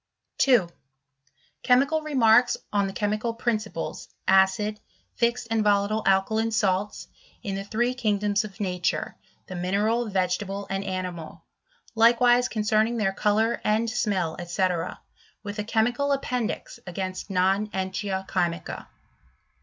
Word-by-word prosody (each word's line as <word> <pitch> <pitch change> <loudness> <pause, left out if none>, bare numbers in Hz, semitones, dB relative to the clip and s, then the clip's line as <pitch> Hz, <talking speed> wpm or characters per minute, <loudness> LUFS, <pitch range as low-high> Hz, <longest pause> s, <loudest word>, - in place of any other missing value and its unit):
2. 245 -9 +4 0.9
Chemical 275 +5 +3
Remarks 250 -6 +4 0.2
on 200 -1 +2
the - - -4
chemical 215 +3 -2
Principles, 215 -7 -3 0.2
acid, 190 +3 +3 0.3
fixed 235 0 0
and 225 -1 +2
volatile 205 +1 +2
alkaline 220 +4 +2
Salts, 205 -3 0 0.4
in 200 - -3
the 195 0 -3
three 235 +5 0
kingdoms 210 -4 0
of 200 -3 -10
nature, 180 -3 -1 0.3
the - - -8
mineral, 210 +6 0
vegetable, 195 +1 -1
and 195 0 -1
ani^ 185 -2 -3
mal; 160 -2 -11 0.5
likewise 240 +2 +5
concerning 220 0 +1
their 195 -3 +1
colour 215 +3 +1
and 220 +2 +1
smell, 200 -8 -1
&C.S 180 +2 0 0.7
with 205 0 -6
a - - 0
chemical 240 +6 +1
appendix 250 -4 -3
against 185 +2 -5
non 195 +2 +2
entia 190 0 -3
chymica. 175 -2 -2
210 Hz, 120 wpm, -25 LUFS, 190-230 Hz, 0.9 s, likewise